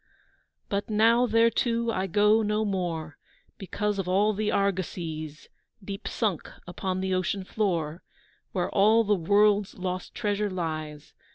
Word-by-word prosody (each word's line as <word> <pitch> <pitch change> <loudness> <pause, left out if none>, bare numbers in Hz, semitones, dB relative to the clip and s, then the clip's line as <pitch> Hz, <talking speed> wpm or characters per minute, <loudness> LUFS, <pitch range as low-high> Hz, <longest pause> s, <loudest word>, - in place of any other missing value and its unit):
But 200 +2 -2
now 230 +3 +4
thereto 230 +1 +2
I 190 -2 -1
go 210 +4 +4
no 210 0 0
more, 170 -6 -3 0.4
Because 205 +1 -2
of 190 - -2
all 200 +4 +2
the 210 +1 -1
argosies, 165 -6 -2 0.4
Deep 195 0 -6
sunk 205 -8 -2 0.2
upon 185 +1 -3
the 190 0 -1
ocean 185 +1 -1
floor, 175 -6 -2 0.5
Where - - -2
all 215 +3 +4
the 210 -1 +2
world's 205 +2 +2
lost 185 -1 -4
treasure 205 0 -1
lies. 155 -5 -5
195 Hz, 130 wpm, -27 LUFS, 180-210 Hz, 0.5 s, now